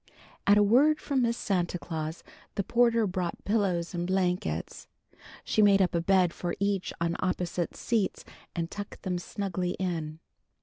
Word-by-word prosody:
At 205 +1 +7
a 205 - +6
word 280 +9 +5
from 275 -3 0
Miss 235 -1 +1
Santa 180 -3 0
Claus 160 -1 -5 0.3
the 200 - 0
porter 235 0 +3
brought 180 -3 -3
pillows 195 -5 0
and 175 0 -2
blankets. 180 - -1 0.6
She 215 - +2
made 200 -1 +6
up 185 -2 +2
a 170 - +1
bed 180 -1 +3
for 175 -1 -3
each 200 -2 0
on 170 0 0
opposite 180 -1 -2
seats 220 -5 -1 0.3
and 170 0 -2
tucked 205 -1 -7
them 180 -2 -1
snugly 185 -1 -3
in. 165 -4 -3
185 Hz, 160 wpm, -29 LUFS, 175-205 Hz, 0.6 s, At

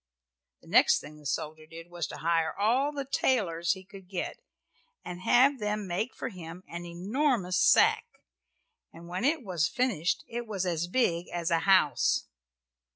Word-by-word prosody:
The - - -20
next - - +5
thing 150 +1 -12
the 150 - -7
soldier 155 +2 -4
did 165 +1 -11
was 175 -3 -3
to - - -8
hire 165 0 0
all 245 +8 +2
the 280 -2 -4
tailors 185 -11 +1
he 190 -1 -10
could 195 -1 -14
get, 185 -1 -4 0.7
and 180 0 -7
have 265 +7 +4
them 210 -1 -2
make 190 +7 -3
for - - -4
him 180 -3 -10
an 170 +1 -7
enormous 190 - 0
sack, - - +4 0.8
and 170 +1 -13
when 180 +4 -4
it 290 +1 +1
was 175 -7 0
finished 225 -9 0
it 240 0 -5
was 195 -3 -2
as 170 -1 -1
big 175 -5 0
as 170 0 -3
a 165 - +3
house. 185 -8 +3
180 Hz, 165 wpm, -29 LUFS, 170-230 Hz, 0.8 s, next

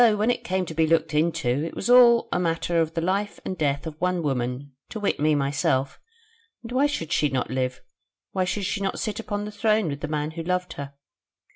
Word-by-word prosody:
when 215 +3 +2
it - - -3
came 185 0 -1
to 160 - -7
be 160 0 +2
looked 160 -1 +2
into, 150 -4 +1
it 165 - -5
was - - -3
all 240 -1 +7
a - - +1
matter 170 0 +1
of 160 +1 -2
the 165 - 0
life 195 +4 -1
and 185 - -3
death 140 -3 -1
of 160 - -5
one 180 -1 0
woman, 130 0 -2 0.2
to 220 - -5
wit 205 - 0
me 150 +1 +3
myself, 140 -1 0 0.6
and 230 - -8
why 270 +3 +3
should 170 - -4
she 150 - +2
not 130 -2 -2
live, 130 -1 -2 0.5
why 190 - 0
should 195 +2 -2
she 200 +2 -2
not 195 - -1
sit 215 -1 -3
upon 205 -2 -3
the 210 - -6
throne 215 -2 +1
with 140 -1 -4
the - - -2
man 150 0 -2
who 165 +1 -6
loved 180 +1 -2
her? 140 0 -8
165 Hz, 230 wpm, -25 LUFS, 145-205 Hz, 0.6 s, all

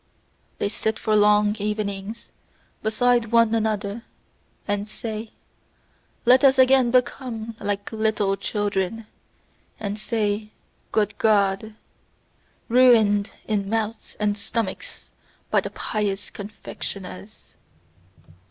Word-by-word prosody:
They - - 0
sit 220 +1 -1
for 215 - +1
long 210 0 +4
evenings 210 +1 -4 0.5
beside 240 +2 +2
one 230 -1 +4
another, 215 -1 -1 0.7
and 205 0 -1
say: 220 0 -5 1.0
"Let 255 +2 +6
us 270 -1 +6
again 260 -1 +5
become 240 -2 -1
like 205 0 -3
little 215 -3 +1
children 205 +1 -2 0.7
and 205 0 -4
say, 215 -1 -1 0.4
'good 210 -1 +1
God!'" 210 0 +2 0.9
ruined 225 -5 +5 0.2
in 200 -2 -1
mouths 225 0 -3
and 210 -1 +1
stomachs 210 -1 -4 0.4
by - - +4
the - - -5
pious 205 -2 -3
confectioners. 200 -1 -8
215 Hz, 95 wpm, -24 LUFS, 205-225 Hz, 1.0 s, Let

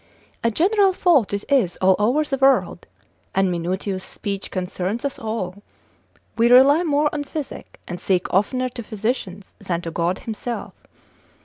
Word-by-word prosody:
A 230 - +3
general 385 - +3
fault 335 - +3
it 200 0 -3
is 245 -11 +2
all 190 0 +4
over 245 +9 +2
the 275 -3 -3
world, 270 0 +2 0.5
and 190 -1 +2
Minutius's 185 +3 -2
speech 200 0 -5
concerns 185 +5 -3
us 280 - -3
all, 205 -4 -4 0.7
we 235 +1 +3
rely 275 +6 +7
more 300 -3 +2
on 295 -1 -2
physic, 290 0 -7
and 175 0 -6
seek 185 -2 +1
oftener 255 +7 +1
to 245 -1 -7
physicians, 210 -3 -4
than 185 -5 -2
to 165 - -5
God 170 +3 0
himself. 230 +1 -5
220 Hz, 150 wpm, -22 LUFS, 190-270 Hz, 0.7 s, rely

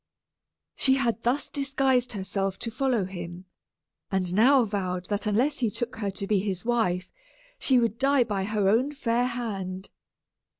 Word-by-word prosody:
She 265 -1 +3
had 235 -4 0
thus 245 +5 0
disguised 270 -3 0
herself 195 -1 -2
to 230 - -4
follow 245 -4 0
him, 175 -1 -7 0.6
and 185 -3 -1
now 250 +5 +5
vowed 185 -3 -3
that 205 +1 -1
unless 250 +8 +1
he 235 -4 +1
took 240 +4 -4
her 205 -3 -2
to 195 +1 -4
be 205 0 +2
his 190 -1 -3
wife, 220 -7 0 0.5
she 265 - +4
would 230 -1 +1
die 275 -1 +4
by 200 -4 -2
her 210 -1 0
own 245 +8 +2
fair 245 -3 0
hand. 195 -6 -5
220 Hz, 160 wpm, -27 LUFS, 195-250 Hz, 0.6 s, now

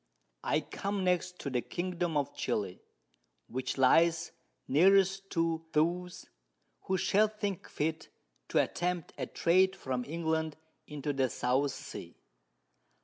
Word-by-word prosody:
_] - - -46 0.4
I - - +1
come 200 -1 -3
next 180 0 +1
to 140 - -4
the 125 -1 +1
Kingdom 175 -1 -2
of 145 - -1
Chili, 95 -3 -2 0.6
which 130 +2 -3
lies 165 +5 +4 0.4
nearest 195 +5 +4
to 165 -1 0
those 175 +3 0 0.6
who 190 - +1
shall 210 +4 +4
think 205 -3 -4
fit 160 +1 -2 0.4
to - - 0
attempt 175 -1 -2
a - - -2
Trade 185 +3 +3
from 130 -7 -3
England 160 0 -1 0.3
into 150 0 -3
the 135 -2 +1
South 130 +5 +1
Sea. - - -9
165 Hz, 130 wpm, -31 LUFS, 145-185 Hz, 0.6 s, lies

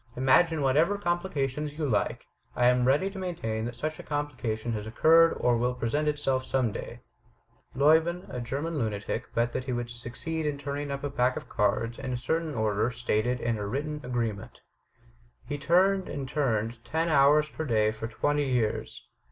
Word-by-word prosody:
Imagine 145 +5 +3
whatever 155 +9 +3
complication 155 -6 -1
you 150 +1 -3
like, 110 -6 -1 0.3
I 120 - +2
am 125 0 +4
ready 145 +10 +2
to 195 - -7
maintain 115 -12 -3
that 120 +1 -5
such 155 +5 -4
a - - -7
complication 130 -6 -3
has 105 -1 -4
occurred 165 +8 +5
or 120 -1 +3
will 125 +1 0
present 145 +6 -1
itself 140 -3 0
some 130 -4 0
day. - - -7 0.7
Lieuben, 160 +6 +3
a 125 - -5
German 140 +7 -3
Itmatic, 110 -3 -2
bet 120 +1 +1
that 130 - -3
he 130 - -3
would 120 0 -3
suc 120 0 -8
ceed 160 +3 -3
in 145 -1 -1
turning 145 +1 -4
up 140 0 -4
a 145 - -2
pack 125 -1 +1
of - - -7
cards 115 +3 0
in 130 - -4
a - - -1
certain 160 +4 -2
order 110 0 +1
stated 120 0 0
in 115 -2 -1
a 100 - -3
written 150 +6 -3
agreement. 115 -2 -3 0.8
He 145 0 -4
turned 185 +5 +3
and 140 -2 -4
turned 115 -5 -1
ten 160 +6 -1
hours 150 0 +5
per 160 - -5
day 110 -6 +2
for 110 +1 -5
twenty 145 +4 0
years. 120 -4 -1
130 Hz, 185 wpm, -28 LUFS, 120-150 Hz, 0.8 s, occurred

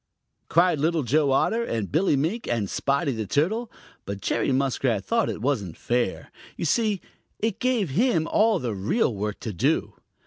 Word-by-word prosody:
cried 170 -2 +3
Little 160 +1 +1
Joe 145 +4 +2
Otter 225 - +2
and 110 - -3
Billy 160 +1 +3
Mink 165 - -1
and 115 -4 0
Spotty 140 - 0
the 110 -4 -4
Turtle, 215 - 0 0.3
but 100 0 -5
Jerry 120 - 0
Muskrat 130 -5 0
thought 230 -1 +1
it 105 - -5
wasn't 105 - -1
fair. 120 -5 -1 0.3
You - - -2
see, 210 +3 +1 0.4
it 220 -1 -2
gave 245 - +1
him 175 - +2
all 220 +1 +3
of 175 - -3
the 120 -3 -1
real 110 - 0
work 105 +1 -3
to 110 -4 -4
do. 85 - 0
145 Hz, 175 wpm, -25 LUFS, -, 0.4 s, cried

